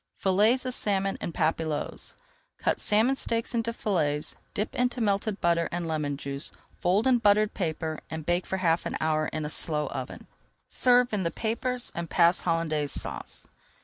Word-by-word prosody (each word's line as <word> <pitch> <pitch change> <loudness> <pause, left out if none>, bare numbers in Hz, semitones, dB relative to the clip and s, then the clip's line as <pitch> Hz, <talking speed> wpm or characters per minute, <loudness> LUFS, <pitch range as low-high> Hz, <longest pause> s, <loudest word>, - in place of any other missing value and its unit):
FILLETS 210 +7 +3
OF 255 - -1
SALMON 195 -4 0
EN - - -3
PAPILLOTES 160 -2 -2 0.4
Cut - - 0
salmon 220 +5 +4
steaks 230 -3 -2
into 230 0 0
fillets, 155 -10 -1 0.2
dip 210 - -2
into 250 0 0
melted 205 -1 0
butter 170 -1 +2
and 170 -1 -3
lemon 150 -3 -1
juice, 140 0 -3 0.3
fold 190 +6 +2
in 255 -2 +4
buttered 210 -1 +3
paper, 160 -3 -2
and 160 -1 -5
bake 175 +2 0
for 190 - -1
half 170 -2 +1
an - - -3
hour 155 -1 +1
in 155 -1 -3
a - - -3
slow 150 -2 0
oven. - - -6 0.4
Serve 245 -2 +3
in 205 - +1
the 170 - 0
papers 245 +5 -2
and 170 -1 -4
pass 170 0 +4
Hollandaise 155 -4 0
Sauce. - - -4
180 Hz, 170 wpm, -27 LUFS, 160-220 Hz, 0.4 s, salmon